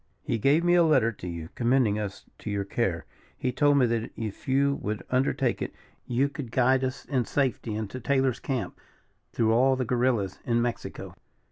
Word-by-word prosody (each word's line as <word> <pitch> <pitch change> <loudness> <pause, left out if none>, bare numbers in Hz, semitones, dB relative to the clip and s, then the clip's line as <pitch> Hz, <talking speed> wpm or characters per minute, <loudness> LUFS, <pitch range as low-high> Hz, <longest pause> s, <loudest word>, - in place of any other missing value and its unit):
"He 115 - -1
gave 145 +8 +3
me 175 0 +4
a 175 - +6
letter 150 -8 +4
to 95 -4 -9
you, 85 -2 -6
commending 120 -4 +2
us 100 -2 -5
to - - -6
your 100 -1 -1
care. 100 - -1 0.3
He 130 - -1
told 145 +2 +3
me 130 - +5
that 115 -1 -1
if 110 -3 -6
you 140 +1 +2
would 105 +1 -3
undertake 130 +1 +1
it, - - -4 0.3
you 125 +3 +2
could 140 -3 -7
guide 130 +1 +3
us 130 +1 -3
in 130 -4 0
safety 130 -5 -1
into 110 +3 -4
Taylor's 130 -1 +1
camp, 125 -9 -3 0.6
through 110 -1 +2
all 130 +3 +4
the 130 -1 -2
guerrillas 120 -5 0
in 120 -1 +1
Mexico." 120 0 -4
125 Hz, 190 wpm, -27 LUFS, 110-135 Hz, 0.6 s, a